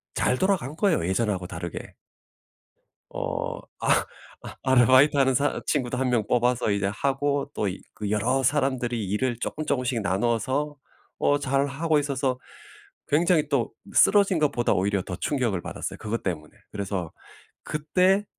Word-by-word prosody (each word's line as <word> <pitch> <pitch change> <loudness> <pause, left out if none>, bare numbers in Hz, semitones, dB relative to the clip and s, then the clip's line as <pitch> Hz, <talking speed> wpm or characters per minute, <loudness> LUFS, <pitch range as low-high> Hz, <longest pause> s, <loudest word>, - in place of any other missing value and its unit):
잘 125 - +1
돌아간 190 -7 0
거예요 170 - +1
예전하고 95 -2 0
다르게. 85 0 -7 1.2
어. - - -3 0.2
아. - - +2 0.4
아 - - -9
아르바이트하는 130 +1 +5
사 145 +4 +1
친구도 125 -4 0
1 130 -1 +1
명 115 -4 +1
뽑아서 125 -1 +1
이제 100 -1 0
하고 140 +2 0
또 105 - -1
이 95 - -5
그 105 -2 -5
여러 125 +6 +1
사람들이 125 -4 0
일을 115 +5 -1
쪼끔 155 +5 -4
쪼끔씩 125 -2 0
나눠서 120 +9 0 0.4
어 145 - +2
잘 140 0 +1
하고 155 +3 0
있어서 135 -3 -1 0.7
굉장히 155 0 +3
또 130 -5 +1 0.2
쓰러진 200 -3 +5
것보다 140 -6 +1
오히려 100 +1 +1
더 90 - -6
충격을 120 - -1
받았어요 - - -6
그것 110 +2 -3
때문에. 75 -5 -4 0.2
그래서 95 -4 -4 0.5
그때 185 +6 +2
130 Hz, 305 characters per minute, -25 LUFS, 105-145 Hz, 1.2 s, 아르바이트하는